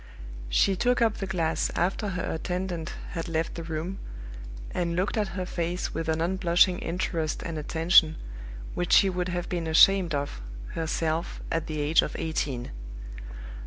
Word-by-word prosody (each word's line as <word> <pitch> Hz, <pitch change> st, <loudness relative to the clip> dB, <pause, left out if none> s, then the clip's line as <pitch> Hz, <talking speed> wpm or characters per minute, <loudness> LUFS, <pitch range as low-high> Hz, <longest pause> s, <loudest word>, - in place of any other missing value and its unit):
She 190 Hz, -, +3 dB
took 245 Hz, +6 st, +2 dB
up 225 Hz, -2 st, +2 dB
the 195 Hz, -, -4 dB
glass 165 Hz, -4 st, 0 dB
after 190 Hz, +5 st, 0 dB
her 185 Hz, -2 st, -3 dB
attendant 175 Hz, 0 st, -3 dB, 0.2 s
had 165 Hz, -, -4 dB
left 165 Hz, 0 st, -1 dB
the 170 Hz, -, -6 dB
room, 165 Hz, +3 st, -4 dB, 0.7 s
and 170 Hz, -1 st, -1 dB
looked 185 Hz, +3 st, 0 dB
at 205 Hz, -4 st, -2 dB
her 185 Hz, -, -2 dB
face 175 Hz, 0 st, -3 dB
with 165 Hz, -1 st, -3 dB
an 160 Hz, 0 st, +1 dB
unblushing 180 Hz, +1 st, +3 dB
interest 165 Hz, -2 st, -2 dB
and 165 Hz, -, -4 dB
attention 160 Hz, +1 st, +4 dB, 0.6 s
which 175 Hz, 0 st, -1 dB
she 195 Hz, -, +6 dB
would 180 Hz, 0 st, -2 dB
have 175 Hz, -1 st, -3 dB
been 170 Hz, -2 st, -2 dB
ashamed 175 Hz, +1 st, +5 dB
of 140 Hz, -, -3 dB, 0.3 s
herself 160 Hz, 0 st, -2 dB
at 165 Hz, -1 st, -1 dB
the 155 Hz, -1 st, -3 dB
age 150 Hz, +2 st, +4 dB
of -, -, -4 dB
eighteen. 140 Hz, -, -2 dB
170 Hz, 160 wpm, -27 LUFS, 160-185 Hz, 0.7 s, she